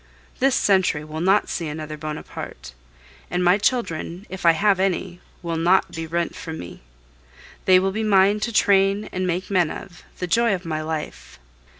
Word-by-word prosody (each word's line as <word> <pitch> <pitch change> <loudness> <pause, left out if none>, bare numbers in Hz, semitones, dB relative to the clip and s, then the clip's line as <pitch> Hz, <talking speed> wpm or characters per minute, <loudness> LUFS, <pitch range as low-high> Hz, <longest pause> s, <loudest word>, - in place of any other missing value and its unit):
This 270 0 +3
century 185 -6 +2
will 155 +1 -6
not 195 +4 +3
see 170 - -3
another 155 0 -5
Bonaparte; 150 - -7 0.6
and 180 +1 -1
my 180 +3 +4
children, 200 -5 -1
if 185 -2 -2
I 165 - +7
have 200 +2 +2
any, 180 -2 -1 0.2
will 170 -1 -2
not 175 +4 +3
be 165 0 -5
rent 170 +1 -2
from 160 -1 -7
me. 90 0 -9 0.8
They 185 -1 +7
will 190 +1 +1
be 215 +3 -3
mine 200 -1 +4
to 230 +2 -2
train 200 -1 +3
and 185 0 -2
make 180 +3 -2
men 180 -5 +3
of 175 +2 -9 0.2
the 180 - -3
joy 230 +3 +2
of 180 - -9
my 155 -1 -2
life. 155 -1 -6
180 Hz, 180 wpm, -23 LUFS, 165-195 Hz, 0.8 s, I